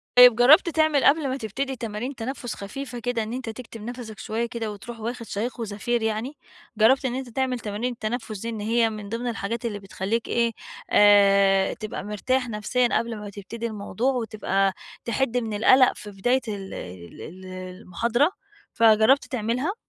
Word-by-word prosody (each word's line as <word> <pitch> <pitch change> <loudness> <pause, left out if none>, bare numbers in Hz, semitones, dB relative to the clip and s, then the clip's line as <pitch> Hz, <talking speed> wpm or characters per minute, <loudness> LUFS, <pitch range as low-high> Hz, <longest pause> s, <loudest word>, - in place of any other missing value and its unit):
طيب 250 -2 +9
جرّبت 270 +9 +6
تعمل 310 -3 +2
قبل 295 0 +4
ما 260 - -2
تبتدي 265 +3 -3
تمارين 235 +3 -5
تنفّس 245 0 -5
خفيفة 245 +4 -7
كده، 235 -1 -1
إن 220 +2 -6
أنتَ 255 -2 -4
تكتم 225 -1 -9
نَفسَك 240 -3 -7
شويّة 225 +2 -2
كده 230 -2 -4
وتروح 225 +3 -9
واخد 235 +2 -5
شهيق 225 +5 -4
وزفير 230 +2 -2
يعني؟ 225 +6 -2 0.4
جرّبت 260 +6 +4
إن 250 -1 -1
أنتَ 260 -1 -5
تعمل 255 +1 -1
تمارين 215 +3 -3
التنفّس 220 -2 -4
دي، 230 - -4
إن 225 -2 -5
هي 225 +2 +2
من 210 -2 -7
ضمن 230 +3 -3
الحاجات 230 0 -3
اللي 210 -3 -3
بتخليك 200 +3 -3
إيه، 235 -1 +1 0.4
آآ، 200 -1 +5
تبقى 215 -2 -6
مرتاح 250 +5 -1
نفسيًا 230 +3 +1
قبل 230 -1 -4
ما 210 0 -7
تبتدي 205 +4 -7
الموضوع 220 +4 -2
وتبقى 210 -5 0 0.3
تحد 240 +1 0
من 225 -3 -2
القلق 255 +5 +5
في 210 - -9
بداية 245 +7 +1
ال 200 -3 -5
ال 90 -2 -9
ال 185 +3 -10
المحاضرة، 185 - -1 0.4
فجربت 225 +4 +5
تعملها؟ 250 - -1
230 Hz, 170 wpm, -25 LUFS, 210-250 Hz, 0.4 s, طيب